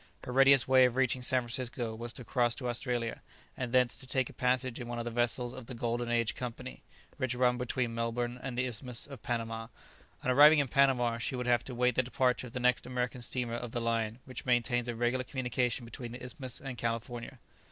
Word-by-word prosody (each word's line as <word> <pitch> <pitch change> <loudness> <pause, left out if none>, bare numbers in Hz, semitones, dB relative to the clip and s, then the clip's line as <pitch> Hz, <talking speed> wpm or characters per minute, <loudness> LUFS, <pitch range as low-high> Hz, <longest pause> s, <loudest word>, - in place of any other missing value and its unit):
Her - - -5
readiest 135 0 +6
way 130 -1 +7
of 125 -1 +1
reaching 130 -1 +2
San 125 0 +3
Francisco 120 -1 -2
was 120 +1 -5
to 125 - -7
cross 120 0 +1
to 125 - -4
Australia, 120 -1 -2 0.3
and 125 -2 -4
thence 125 -1 +3
to 130 - -7
take 130 -1 0
a - - -17
passage 125 -1 0
in 120 - -6
one 120 0 -4
of 120 - -3
the 120 - -3
vessels 120 +1 +1
of 130 -3 -9
the 130 - -7
"Golden 120 +1 -2
Age" 115 -1 +1
Company, 125 +1 -7 0.4
which 130 -4 -1
run 125 0 +2
between 125 -1 -1
Melbourne 120 +1 -2
and 125 -2 -5
the 125 - +1
Isthmus 125 0 -2
of 140 -2 -10
Panama: 115 -1 -3 0.6
on 130 - +2
arriving 150 +4 +8
in 140 -3 +2
Panama 125 -4 +3
she 130 - -2
would 125 0 -3
have 120 -1 +3
to 125 - -6
wait 125 +1 +3
the 130 - +3
departure 125 0 0
of 115 - -13
the 125 - -3
next 125 0 +2
American 125 0 -2
steamer 120 0 -2
of 120 -1 -5
the 120 - -1
line 115 -1 -1
which 130 - -7
maintains 120 -1 +1
a 120 - -3
regular 120 +2 0
communication 125 -2 -1
between 120 +1 -7
the 125 +1 -7
Isthmus 130 -1 -6
and 130 -4 -7
California. 115 +1 -3
125 Hz, 225 wpm, -31 LUFS, 120-130 Hz, 0.6 s, arriving